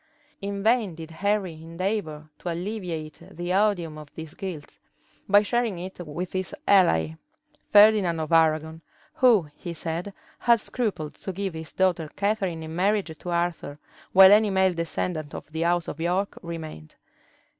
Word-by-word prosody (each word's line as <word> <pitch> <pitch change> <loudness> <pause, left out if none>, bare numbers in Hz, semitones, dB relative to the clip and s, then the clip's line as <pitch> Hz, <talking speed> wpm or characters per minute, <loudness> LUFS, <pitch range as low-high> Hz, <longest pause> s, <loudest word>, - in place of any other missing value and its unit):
In 200 0 -4
vain 220 -6 +2
did 165 0 -9
Henry 200 +1 0
endeavor 165 -2 -3
to 180 - -4
alleviate 170 -4 -5
the 175 +2 -4
odium 180 -6 +1
of 150 - -10
this 160 -2 -8
guilt, 175 -7 -7 0.5
by 205 +1 +6
sharing 235 -3 0
it 185 +2 -8
with 175 +2 -5
his 185 -1 -3
ally, 160 - +4 0.6
Ferdinand 205 -5 +6
of 155 0 -4
Arragon, 160 0 +2 0.3
who, 230 - +4
he 170 -2 -7
said, 170 +4 -4 0.3
had 235 -1 +4
scrupled 210 -10 -3
to 190 - -6
give 190 0 -3
his 160 -1 -7
daughter 175 -4 +1
Catharine 200 -5 -1
in 160 0 -7
marriage 190 -2 +1
to 175 - -8
Arthur 170 -4 -2 0.3
while 190 0 +9
any 210 +1 +6
male 190 -1 +3
descendant 165 -2 -3
of - - -9
the 160 +1 -3
house 175 0 +1
of 150 - -6
York 180 +4 0
remained. 160 - -8
175 Hz, 155 wpm, -25 LUFS, 160-200 Hz, 0.6 s, while